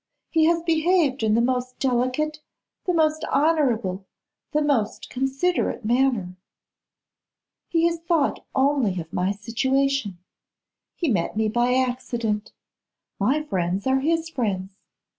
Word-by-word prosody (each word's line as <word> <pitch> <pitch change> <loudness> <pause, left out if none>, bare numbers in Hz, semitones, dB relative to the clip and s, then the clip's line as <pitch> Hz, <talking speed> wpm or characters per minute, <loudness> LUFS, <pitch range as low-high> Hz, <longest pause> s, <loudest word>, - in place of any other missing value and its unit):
He 320 -1 +4
has 335 0 +2
behaved 325 -4 +2
in 215 -1 +2
the 230 - +3
most 250 0 -1
delicate, 260 +4 0 0.5
the 360 - +1
most 310 -1 +2
honourable, 250 - +1 0.5
the 300 0 +1
most 265 -8 -1
considerate 270 0 -1
manner. 235 -6 +1 1.3
He 330 0 +2
has 340 0 +1
thought 330 -3 0
only 265 -9 +2
of 160 -1 -8
my 185 +2 +1
situation. 260 +1 0 0.8
He 340 - -2
met 200 - 0
me 220 0 +2
by 240 +3 +2
accident. 240 -4 -1 0.7
My 270 +10 +1
friends 185 - -2
are 265 0 +3
his 325 +3 0
friends. 200 - -3
260 Hz, 120 wpm, -24 LUFS, 215-305 Hz, 1.3 s, He